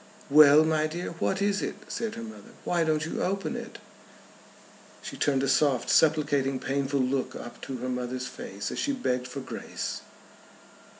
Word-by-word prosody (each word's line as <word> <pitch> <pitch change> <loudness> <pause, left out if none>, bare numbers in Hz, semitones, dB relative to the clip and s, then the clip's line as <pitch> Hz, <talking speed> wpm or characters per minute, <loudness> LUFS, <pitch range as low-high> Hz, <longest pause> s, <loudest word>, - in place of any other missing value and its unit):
"Well, 150 +1 +8
my 155 -1 +2
dear; 170 +3 -5
what 195 +1 0
is 200 0 +1
it?" - - -3
said 225 -1 -3
her 230 - -6
mother. 225 +1 -11
"Why 170 -1 +1
don't 155 -1 +1
you 165 - -3
open 195 +1 -1
it?" - - -7 1.3
She - - -6
turned 135 -2 +1
a - - +1
soft 135 -1 +2
supplicating 145 -4 +3
painful 140 +1 0
look 130 +1 -1
up 120 0 -9
to 135 - -5
her 125 +1 -4
mother's 125 0 -3
face 100 -4 -6
as - - -4
she 285 - 0
begged 125 - -1
for 135 +2 -6
grace. 130 - -5
145 Hz, 170 wpm, -28 LUFS, 130-170 Hz, 1.3 s, Well